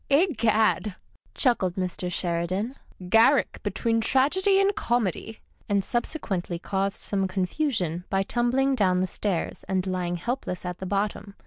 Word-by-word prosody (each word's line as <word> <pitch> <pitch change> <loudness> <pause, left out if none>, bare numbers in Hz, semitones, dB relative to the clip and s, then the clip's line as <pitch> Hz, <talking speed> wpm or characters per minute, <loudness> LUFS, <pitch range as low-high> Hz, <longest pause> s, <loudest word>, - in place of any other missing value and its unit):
" - - -38
Egad! 220 - +2 0.2
" - - -36
chuckled 205 - +1
Mr. 180 -1 -3
Sheridan, 180 +7 -1 0.2
" 180 -1 -12
Garrick 225 +1 +4
between 230 -1 0
Tragedy 370 - +3
and 395 0 +2
Comedy," 220 -2 -1 0.3
and 200 -2 +1
subsequently 200 - -2
caused 195 +2 -2
some 195 -2 0
con 185 0 -1
fusion 180 - -1
by 195 0 +1
tumbling 250 +5 +1
down 185 -7 +2
the - - +2
stairs 185 -2 -2
and 190 -1 0
lying 180 -2 -2
helpless 185 -1 -4
at 180 0 -5
the 190 - -5
bottom. 200 +1 -2
200 Hz, 150 wpm, -26 LUFS, 185-240 Hz, 0.3 s, Garrick